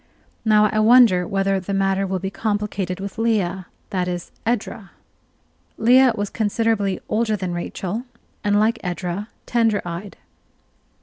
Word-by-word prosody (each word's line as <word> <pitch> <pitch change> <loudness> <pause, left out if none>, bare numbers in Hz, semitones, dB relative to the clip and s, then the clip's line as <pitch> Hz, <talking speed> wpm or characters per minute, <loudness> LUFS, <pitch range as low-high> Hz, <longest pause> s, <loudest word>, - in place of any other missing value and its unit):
Now 215 -1 +5
I 215 - 0
wonder 215 -6 +6
whether 195 0 +1
the 195 +2 -4
matter 195 0 +1
will 190 0 -1
be 190 +1 -4
complicated 205 -4 -2
with 200 +2 -6
Leah 190 -6 0 0.2
that 180 -3 -1
is, 175 -1 -4 0.2
Edra? 220 -3 -2 0.9
Leah 250 +2 +5
was 205 -2 -3
considerably 215 -3 0
older 220 -1 +1
than 185 -3 -3
Rachel, 190 +6 -4 0.4
and, 205 -1 +2
like 220 +2 +2
Edra, 180 +2 -3 0.2
tender 225 -3 +2
eyed. 175 +4 -6
200 Hz, 135 wpm, -21 LUFS, 185-220 Hz, 0.9 s, wonder